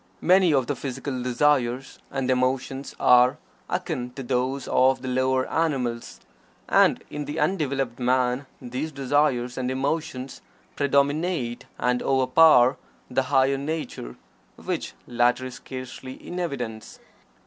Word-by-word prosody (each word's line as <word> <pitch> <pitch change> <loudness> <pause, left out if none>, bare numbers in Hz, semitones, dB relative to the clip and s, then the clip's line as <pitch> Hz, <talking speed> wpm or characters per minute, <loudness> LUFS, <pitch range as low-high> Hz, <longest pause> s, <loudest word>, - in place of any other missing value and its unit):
Many 185 -1 +5
of 135 -4 +2
the - - -2
physical 135 -1 -4
desires 125 0 +1
and 135 -1 -1
emotions 130 +1 -1
are 125 +3 +5 0.3
akin 160 -9 -3
to 135 - -7
those 130 +2 -1
of 130 0 +3
the - - -4
lower 130 0 +1
animals, 130 -8 -2 0.5
and - - +4
in 150 0 -4
the 150 +3 -4
undeveloped 135 -9 -1
man 125 +1 +1
these 130 +5 -4
desires 135 -3 0
and 125 -1 -1
emotions 135 -1 -3 0.3
predominate 140 -2 0
and 125 0 0
overpower 130 0 +5 0.3
the 130 - +2
higher 135 0 +3
nature, 140 - -5 0.4
which - - -4
latter 120 +1 +1
is 130 - -6
scarcely 130 0 -8
in 180 +6 -7
evidence. 125 -10 -5
130 Hz, 125 wpm, -25 LUFS, 125-145 Hz, 0.5 s, Many